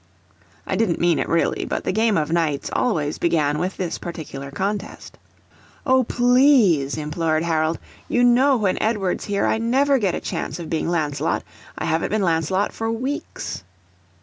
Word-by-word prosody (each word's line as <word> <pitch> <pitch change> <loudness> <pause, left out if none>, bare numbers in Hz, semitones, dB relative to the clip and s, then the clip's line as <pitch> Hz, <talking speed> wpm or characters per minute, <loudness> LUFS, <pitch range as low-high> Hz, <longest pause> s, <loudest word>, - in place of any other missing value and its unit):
I - - -2
didn't 205 -7 +1
mean 170 -2 +2
it - - -2
really, 170 - +1
but - - -3
the - - -1
game 220 +1 +2
of 155 0 -1
Knights 160 -4 0
always 155 - 0
began 150 -3 +1
with 180 +3 -3
this 180 -3 -3
particular 145 -5 -7
contest. 200 +7 -4 0.7
"O 260 -1 +4
PLEASE," 245 - +3
implored 155 +1 -1
Harold. 160 -1 0 0.3
"You 245 - +2
know 255 +3 +5
when 200 -4 0
Edward's 210 -5 -1
here 200 -1 0
I 220 - +1
never 270 +4 +2
get 195 -5 0
a - - -2
chance 145 - -4
of 170 -3 -7
being 165 +1 -1
Lancelot. 150 -4 -1 0.3
I - - -3
haven't 160 +1 0
been 215 -1 0
Lancelot 170 +3 0
for 225 0 -3
weeks!" 255 - -4
180 Hz, 165 wpm, -22 LUFS, 160-230 Hz, 0.7 s, know